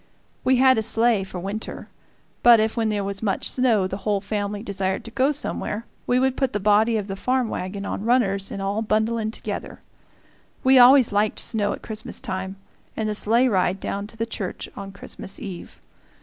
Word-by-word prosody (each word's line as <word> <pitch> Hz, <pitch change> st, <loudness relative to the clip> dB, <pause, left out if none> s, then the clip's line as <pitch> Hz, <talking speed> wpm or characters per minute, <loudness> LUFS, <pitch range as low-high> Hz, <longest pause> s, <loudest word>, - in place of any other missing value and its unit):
We 260 Hz, -, +4 dB
had 260 Hz, -1 st, +5 dB
a -, -, +1 dB
sleigh 225 Hz, -1 st, +2 dB
for 190 Hz, -1 st, -7 dB
winter; 200 Hz, +4 st, -5 dB, 0.5 s
but 240 Hz, -2 st, +7 dB
if, 220 Hz, 0 st, 0 dB
when 225 Hz, -2 st, 0 dB
there 205 Hz, -1 st, -1 dB
was 195 Hz, 0 st, -4 dB
much 200 Hz, -3 st, -1 dB
snow, 235 Hz, -7 st, +2 dB
the 190 Hz, +1 st, -3 dB
whole 205 Hz, 0 st, 0 dB
family 205 Hz, 0 st, -3 dB
desired 195 Hz, -2 st, -2 dB
to 230 Hz, -, -8 dB
go 265 Hz, +4 st, +2 dB
somewhere, 230 Hz, -6 st, -4 dB, 0.2 s
we 245 Hz, -, +3 dB
would 260 Hz, 0 st, +1 dB
put 265 Hz, -2 st, -1 dB
the 205 Hz, -, 0 dB
body 215 Hz, +3 st, +3 dB
of 210 Hz, -, -2 dB
the 195 Hz, -1 st, -5 dB
farm 250 Hz, +3 st, 0 dB
wagon 200 Hz, +2 st, -4 dB
on 200 Hz, -, -4 dB
runners 210 Hz, -5 st, +1 dB
and 195 Hz, -, -5 dB
all 200 Hz, +3 st, -1 dB
bundle 220 Hz, +1 st, +1 dB
in 220 Hz, -1 st, -1 dB
together. 220 Hz, -, -6 dB, 0.8 s
We 260 Hz, 0 st, +6 dB
always 255 Hz, -1 st, +7 dB
liked 205 Hz, +1 st, +1 dB
snow 210 Hz, -3 st, 0 dB
at -, -, -9 dB
Christmas 220 Hz, 0 st, -6 dB
time, 190 Hz, 0 st, -4 dB, 0.4 s
and 220 Hz, -, -1 dB
the 215 Hz, -, -1 dB
sleigh 230 Hz, +4 st, +3 dB
ride 190 Hz, -3 st, +1 dB
down 200 Hz, +1 st, -4 dB
to 225 Hz, -, -14 dB
the 225 Hz, -, -1 dB
church 210 Hz, -5 st, -5 dB
on 195 Hz, -1 st, -7 dB
Christmas 195 Hz, -1 st, -8 dB
eve. 185 Hz, -4 st, -8 dB
215 Hz, 200 wpm, -23 LUFS, 195-235 Hz, 0.8 s, but